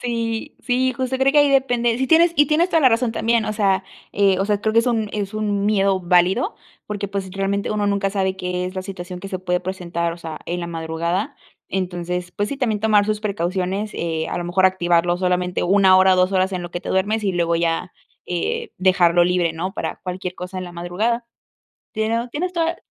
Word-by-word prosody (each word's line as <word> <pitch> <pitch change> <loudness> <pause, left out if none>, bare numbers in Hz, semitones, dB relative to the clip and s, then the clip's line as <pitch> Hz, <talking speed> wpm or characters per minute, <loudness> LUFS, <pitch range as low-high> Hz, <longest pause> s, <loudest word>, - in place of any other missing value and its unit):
Sí, 230 -2 -3
sí, 255 +1 +1
justo 260 +1 -2
creo 270 +1 +3
que 295 - +5
ahí 290 -1 +5
depende, 245 -3 +2
sí 265 - 0
tienes 335 +3 +5
y 295 - +5
tienes 315 +5 +2
toda 325 - +3
la 265 - +6
razón 235 0 +1
también, 230 0 +1
o - - -1
sea, 195 -3 +1 0.3
eh, 195 -2 +3
o 195 - +1
sea, 205 0 0
creo 220 0 0
que 230 - +4
es 230 - +2
un 225 -4 0
es 205 0 -3
un 205 -2 -1
miedo 195 -2 +2
válido 180 - +2 0.3
porque, 205 -1 -4
pues, 195 -1 -4
realmente 195 +1 -1
uno 210 -1 0
nunca 200 0 +1
sabe 190 -1 -1
qué 180 -1 -3
es 185 +1 -5
la 185 - -2
situación 185 -2 -7
que 195 - -7
se 185 - -4
puede 180 -1 0
presentar, 175 -2 -3
o - - -8
sea, 160 -2 -7
en 175 +1 -3
la 170 - -4
madrugada. 170 +3 -2 0.4
Entonces, 180 -1 -3
pues 205 +2 -2
sí, 280 - -4
también 225 -6 -1
tomar 210 -1 +4
sus 210 0 -1
precauciones, 195 0 -2
eh, 160 -1 -2
a - - -3
lo 175 - -4
mejor 180 +2 +1
activarlo 175 -2 +2
solamente 180 -1 0
1 190 0 +5
hora, 190 0 +5
2 185 +1 +2
horas 190 0 +1
en 180 -1 -3
lo 175 - -7
que 175 - -4
te - - -8
duermes 210 +3 0
y 195 - +1
luego 170 -1 +1
ya, 170 +1 -1 0.3
eh 175 -1 -2
dejarlo 175 -2 +4
libre, 175 -2 +1
¿no? 175 +4 -4
Para - - -4
cualquier 180 -1 -5
cosa 180 +1 -7
en 185 - -4
la 175 - -9
madrugada. 205 +8 -2 0.7
Tienes 230 +2 -1
tienes 355 +8 -3
toda, 335 -1 0
195 Hz, 225 wpm, -21 LUFS, 180-220 Hz, 0.7 s, la